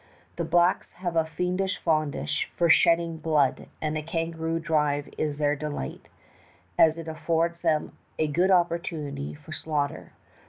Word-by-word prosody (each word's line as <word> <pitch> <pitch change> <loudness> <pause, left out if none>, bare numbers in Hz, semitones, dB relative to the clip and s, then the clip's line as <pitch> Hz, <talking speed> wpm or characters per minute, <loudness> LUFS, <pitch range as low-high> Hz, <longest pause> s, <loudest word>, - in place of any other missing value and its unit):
The - - -1
blacks 175 +1 +2
have 175 -2 -4
a 165 -1 +3
fiendish 180 +3 -1
fondness 155 -3 0
for 170 -2 +4
shedding 170 -1 +4
blood, 155 -4 +1
and 155 0 -2
a 155 - -1
kangaroo 165 0 -2
drive 150 -3 +1
is 150 -2 -2
their 145 -1 +2
delight, 145 - -5 0.7
as 160 0 +5
it 165 -1 -7
affords 165 +1 -1
them 160 -3 0 0.2
a 155 - +2
good 170 +5 +2
opportunity 170 -6 0
for 150 +1 -14
slaughter. 150 -2 -3
160 Hz, 145 wpm, -27 LUFS, 150-170 Hz, 0.7 s, as